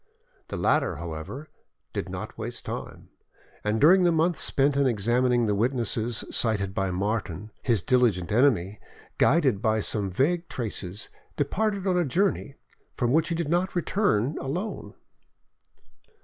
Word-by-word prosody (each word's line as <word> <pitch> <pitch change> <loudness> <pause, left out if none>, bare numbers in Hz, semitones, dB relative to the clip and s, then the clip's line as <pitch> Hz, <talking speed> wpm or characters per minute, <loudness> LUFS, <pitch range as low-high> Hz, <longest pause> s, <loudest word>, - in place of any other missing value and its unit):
The - - -5
latter, 135 - +1
however, 85 - -7 0.5
did - - -3
not - - -6
waste - - -6
time, - - -7 0.5
and 105 +1 0
during 180 +8 +6
the 175 -1 +4
month 165 +2 +2
spent 140 +1 +2
in 140 -1 +3
examining 120 +2 +2
the 105 - +1
witnesses 115 0 0
cited 100 -4 0
by 95 -1 -1
Martin, 100 +1 -3
his 115 -8 +1
diligent 115 -9 +2
enemy, 105 -5 +2 0.4
guided 135 -10 +3
by 110 -1 +2
some 105 -1 0
vague 165 - 0
traces, 105 -4 -4 0.3
departed 200 +7 -1
on 180 -2 +2
a - - +3
journey, 165 -1 0 0.4
from 120 -1 +1
which 160 +1 +2
he 170 - -1
did 165 -2 -2
not 180 +3 0
return 170 - +1
alone. 175 +11 -4
125 Hz, 140 wpm, -26 LUFS, 105-160 Hz, 0.5 s, during